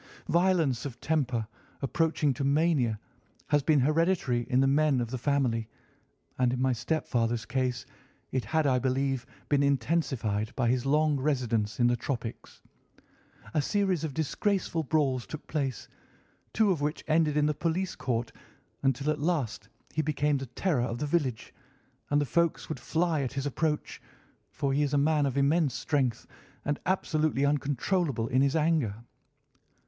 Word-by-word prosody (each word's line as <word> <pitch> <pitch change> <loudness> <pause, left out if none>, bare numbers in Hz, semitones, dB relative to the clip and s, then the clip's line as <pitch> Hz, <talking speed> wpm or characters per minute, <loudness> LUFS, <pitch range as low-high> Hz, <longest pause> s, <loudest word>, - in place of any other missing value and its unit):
Violence 170 -8 +2
of 135 -4 -6
temper 130 -8 0 0.4
approaching 150 0 +1
to 135 - -4
mania 140 -6 +2 0.5
has 145 -1 +3
been 150 +1 +3
hereditary 150 -5 +1
in 125 - +3
the 135 - +4
men 140 0 +3
of 120 -1 -3
the 130 - -2
family, 125 -5 0 0.7
and 125 -1 +3
in 125 - -2
my 130 0 +2
stepfather's 120 -3 -1
case 125 +1 -1 0.5
it 130 -2 0
had, 155 +8 +1
I 130 -2 +3
believe, 135 0 -1 0.2
been 145 -1 +2
intensified 130 -6 0
by 120 -3 +1
his 125 +1 0
long 150 0 +3
residence 120 -7 0
in 120 - +4
the 120 0 +4
tropics. 120 -1 -6 0.9
A 150 - +2
series 190 0 0
of 150 -4 -4
disgraceful 170 +2 0
brawls 135 -6 0
took 155 - -8
place, 135 - -3 0.6
two 215 -3 +3
of 165 -6 -1
which 150 +1 -2
ended 155 -1 +2
in 150 - +3
the 150 - +2
police 170 +5 -1
court, 120 -2 -2 0.5
until 135 +2 +1
at 150 - -3
last 145 -7 -1 0.2
he 155 - +1
became 150 -1 +1
the 135 - -6
terror 140 +3 0
of 120 -1 -2
the 150 - -2
village, 145 -7 -1 0.6
and 145 - +3
the 145 - +1
folks 170 +4 0
would 155 - -4
fly 160 +4 0
at 130 - -3
his 135 0 -3
approach, 150 +2 -2 0.5
for 140 -1 -1
he 145 - +2
is 145 0 +1
a - - +4
man 145 0 +3
of 135 0 -3
immense 145 +1 +2
strength, 130 -6 0 0.4
and 145 0 -1
absolutely 155 -6 +1
uncontrollable 145 - 0
in 130 +2 +3
his 140 +2 +2
anger. 155 -9 +2
140 Hz, 160 wpm, -29 LUFS, 125-155 Hz, 0.9 s, the